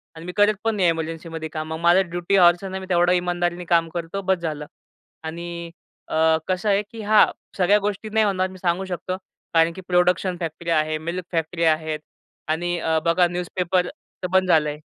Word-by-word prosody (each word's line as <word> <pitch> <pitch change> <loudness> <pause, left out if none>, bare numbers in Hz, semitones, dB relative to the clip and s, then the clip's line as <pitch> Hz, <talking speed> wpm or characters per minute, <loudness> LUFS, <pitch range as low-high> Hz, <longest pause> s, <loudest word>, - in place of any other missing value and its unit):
अन् 160 +1 -10
मी 180 - -4
करत 205 +1 +5
पण 225 -1 +1
नाही 185 -4 +3
इमर्जन्सीमध्ये 165 0 -4
काम. 155 0 -5
मग 160 - -5
माझं 175 +2 +4
ड्युटी 175 +3 -1
हॉवर्स 175 0 +5
नाही 190 0 -4
मी - - -7
तेवढं 175 0 +3
इमानदारीने 175 0 -1
काम 165 -1 +2
करतो, 170 +3 -4
बस 190 -1 +1
झालं. 155 -3 -4 0.6
आणि 170 +1 -6 0.4
अ, 160 0 +3
कसं 185 +3 0
आहे 200 0 +3
की 225 - -8
हां, 215 0 +6 0.3
सगळ्या 195 +2 +4
गोष्टी 205 +1 -3
नाही 220 0 +2
होणार 190 -2 +1
मी 185 - -11
सांगू 180 +1 -1
शकतो 185 0 -4 0.4
कारण 165 0 +4
की 190 - -9
प्रोडक्शन 180 0 +2
फॅक्टरी 165 0 -5
आहे, 155 -1 +1
मिल्क 170 +3 -5
फॅक्टरी 165 0 -1
आहेत 155 -1 +1 0.5
आणि 175 +2 -1
अ, 160 0 +1
बघा 175 +1 +4
न्यूजपेपर 180 +1 -1
तर 235 -9 -9
बंद 190 0 +4
झालंय. 150 -3 +2
175 Hz, 190 wpm, -23 LUFS, 165-185 Hz, 0.6 s, हां